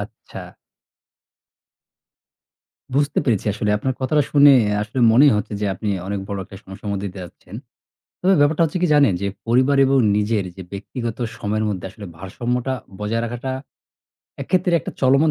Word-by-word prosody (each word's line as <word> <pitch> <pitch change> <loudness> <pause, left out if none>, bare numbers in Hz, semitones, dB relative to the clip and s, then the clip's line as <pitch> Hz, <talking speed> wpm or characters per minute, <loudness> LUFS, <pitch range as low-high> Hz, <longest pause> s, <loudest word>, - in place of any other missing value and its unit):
আচ্ছা। - - -10 2.4
বুঝতে 145 +1 +1
পেরেছি 110 -7 0
আসলে 105 +1 -1
আপনার 130 +3 -2
কথাটা 150 +3 +2
শুনে 145 -1 +7 0.3
আসলে 105 +5 -5
মনেই 140 +5 +6
হচ্ছে 105 - -3
যে, 105 - 0
আপনি 105 +4 -5 0.2
অনেক 100 0 -3
বড় 100 - -3
একটা 95 - -12
সমস্যার 95 +2 -8
মধ্যে 100 0 -3
দিয়ে 95 -1 -8
যাচ্ছেন। 90 +2 -14 0.7
তবে 190 +1 +4
ব্যাপারটা 145 +3 +3
হচ্ছে 165 +3 -3
কি 180 - +3
জানেন 140 -8 +5
যে, 100 - 0 0.2
পরিবার 130 +4 +3
এবং 135 +1 +3 0.2
নিজের 105 -1 0
যে 95 - -8
ব্যক্তিগত 115 +3 -5 0.2
সময়ের 110 +1 -1
মধ্যে 95 -3 -4
আসলে 105 +1 -11
ভারসাম্যটা 120 +8 -3 0.3
বজায় 110 +2 -1
রাখাটা 120 +3 -4 0.9
এক - - -9
ক্ষেত্রে 180 -1 +2
একটা - - -6
চলমান 140 +4 +4
115 Hz, 155 wpm, -21 LUFS, 100-140 Hz, 2.4 s, শুনে